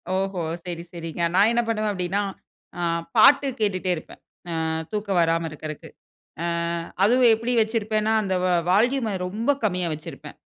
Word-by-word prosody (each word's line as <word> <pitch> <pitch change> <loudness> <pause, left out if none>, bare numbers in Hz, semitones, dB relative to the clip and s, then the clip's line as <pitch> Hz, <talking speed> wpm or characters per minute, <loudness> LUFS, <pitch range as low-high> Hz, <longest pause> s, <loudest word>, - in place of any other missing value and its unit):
ஓஹோ! 190 -1 -1 0.2
சரி, 170 -1 -5
சரிங்க. 165 -1 -6
நான் 200 +3 +5
என்ன 235 0 +2
பண்ணுவேன் 215 -2 0
அப்டின்னா, 185 +1 -1 0.6
அ - - -2 0.4
பாட்டு 280 0 +7
கேட்டுக்கிட்டே 190 -3 0
இருப்பேன். 155 - -11 0.3
அ - - -2 0.4
தூக்கம் 205 -3 -1
வராம 165 0 +1
இருக்கறக்கு. 155 0 -8 0.5
ஆ - - -2 0.6
அதுவும் 245 +3 +5
எப்டி 230 +3 -2
வச்சிருப்பேன்னா 220 -1 0
அந்த 190 -2 -1 0.4
வால்யூம்ம 230 +3 +2
ரொம்ப 220 +8 -1
கம்மியா 180 -4 0
வச்சிருப்பேன். 155 - -10
200 Hz, 135 wpm, -24 LUFS, 175-220 Hz, 0.6 s, பாட்டு